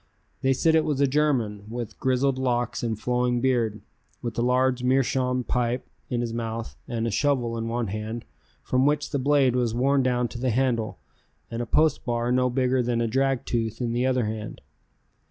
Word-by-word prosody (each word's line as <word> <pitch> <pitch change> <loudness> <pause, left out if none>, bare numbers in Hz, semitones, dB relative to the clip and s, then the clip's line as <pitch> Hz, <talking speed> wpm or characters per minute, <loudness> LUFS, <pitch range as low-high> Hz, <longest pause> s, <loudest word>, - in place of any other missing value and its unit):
They 135 - +2
said 160 +5 +2
it 160 -1 +4
was 145 -3 -1
a 140 - +5
German 130 -8 0
with 120 -1 -6
grizzled 130 +1 +1
locks 120 -2 0
and 115 -3 -2
flowing 125 +1 +1
beard, 120 -4 +1 0.4
with 120 -2 -3
a - - +2
large 125 +1 +2
meerschaum 125 0 +1
pipe 125 +1 -1 0.2
in 120 -2 0
his 115 -1 -3
mouth 115 0 -4
and 115 -1 -2
a 115 - -1
shovel 120 0 +1
in 115 0 -3
one 120 +1 -1
hand 110 +3 -5 0.4
from 130 +2 +2
which 145 0 0
the 140 - 0
blade 135 -2 +3
was 120 -2 0
worn 135 +3 +3
down 125 -1 +1
to 120 - -7
the 130 +1 0
handle 120 -2 0 0.5
and 115 +1 -3
a 120 - -4
post 155 +6 +2
bar 120 0 -1
no 125 0 +3
bigger 130 0 +1
than 120 -1 0
a 120 - +1
drag 135 +2 +1
tooth 115 -2 -2
in 120 -2 -1
the 125 +2 +1
other 130 -3 +1
hand. 110 0 -5
125 Hz, 195 wpm, -25 LUFS, 115-130 Hz, 0.5 s, a